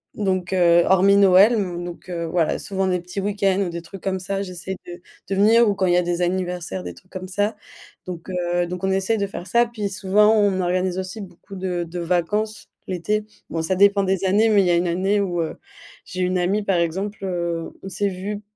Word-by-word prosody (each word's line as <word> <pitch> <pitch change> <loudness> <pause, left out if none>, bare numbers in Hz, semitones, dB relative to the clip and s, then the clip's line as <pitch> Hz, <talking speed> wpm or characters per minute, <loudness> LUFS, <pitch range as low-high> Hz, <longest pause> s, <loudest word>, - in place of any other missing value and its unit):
donc, 190 -3 -1
heu, 175 -1 +5
hormis 195 +1 +5
Noël, 200 +3 +6
donc, 175 -3 -4
heu, 170 -1 -3
voilà, 165 -1 0
souvent 195 -1 -2
des 180 -1 +1
petits 180 +3 -5
week-ends 195 -1 +1
ou 190 - -1
des 170 0 -5
trucs 190 +2 -11
comme 190 -1 -1
ça, 195 +1 -3
j'essaie 185 0 -5
de 175 0 -9 0.3
de 195 - 0
venir 220 +3 +5
ou 200 - 0
quand 190 - 0
il 175 - +3
y - - +4
a - - +4
des 175 0 -2
anniversaires, 175 - -2
des 90 -1 -6
trucs 185 - -20
comme 185 -1 -6
ça, 205 +3 -1 0.5
donc, 175 -2 -7
heu, 175 -1 0
donc 180 +1 -6
on 190 - +1
essaye 195 +4 +1
de 200 - 0
faire 185 -2 -7
ça, 235 0 +3
puis 215 -4 -4
souvent, 205 +2 +3
on 200 -3 +2
organise 180 +1 0
aussi 190 +4 -6
beaucoup 195 +1 -11
de 180 -2 -2
de 170 +1 -6
vacances, 185 +6 -1 0.2
l'été. 210 +4 -1 0.3
Bon 165 - -1
ça 175 +4 0
dépend 200 +1 +5
des 190 0 0
années, 210 +4 +3
mais 205 -2 +5
il - - 0
y - - +3
a - - +4
une 175 +1 +1
année 190 +4 +1
où, 175 -3 -1
heu, 160 - -4 0.5
j'ai 185 - -5
une 180 0 +1
amie 195 +4 +1
par 195 -3 +1
exemple, 190 +5 -2
heu, 170 -3 -2
on 190 - -6
s'est 200 +1 -1
vues 200 +2 -5
185 Hz, 230 wpm, -22 LUFS, 175-200 Hz, 0.5 s, Noël